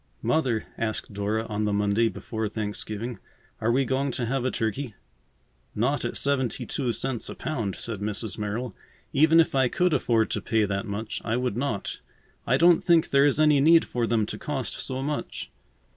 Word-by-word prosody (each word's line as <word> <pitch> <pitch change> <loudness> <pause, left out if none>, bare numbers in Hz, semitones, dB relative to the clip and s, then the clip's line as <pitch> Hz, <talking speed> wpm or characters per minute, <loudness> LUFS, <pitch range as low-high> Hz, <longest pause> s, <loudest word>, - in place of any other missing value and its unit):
"Mother," 125 -8 +1
asked 110 -2 -2
Dora 105 +3 -1
on 105 -1 -2
the 105 - +1
Monday 105 +3 +2
before 110 -2 -4
Thanksgiving, 110 +2 -4 0.4
"are 110 +1 +1
we 135 +3 +2
going 135 +3 0
to 120 - -1
have 130 +2 -1
a 130 - +1
turkey?" 115 +1 -2 0.8
"Not 130 +7 +1
at - - -2
seventy 130 -3 0
two 125 +1 -1
cents 125 0 -3
a - - -6
pound," 115 - -3
said 115 -4 -5
Mrs. 105 +1 -3
Merrill. 105 +2 -3 0.4
"Even 160 +3 +5
if 165 - +3
I 130 -2 +3
could 180 +6 +1
afford 115 -5 +2
to - - -1
pay 110 -2 +2
that 100 +2 -2
much, 105 +2 -4
I 115 +1 0
would 125 -4 -1
not. 120 -6 -2 0.5
I 125 - +4
don't 170 +2 +6
think 170 -2 +4
there 140 0 +5
is 145 +1 +1
any 150 -2 +5
need 165 +3 +6
for 120 -2 -1
them 110 -2 +2
to 105 - -6
cost 135 -8 -3
so 130 0 -3
much." 150 +1 -4
120 Hz, 190 wpm, -26 LUFS, 110-140 Hz, 0.8 s, don't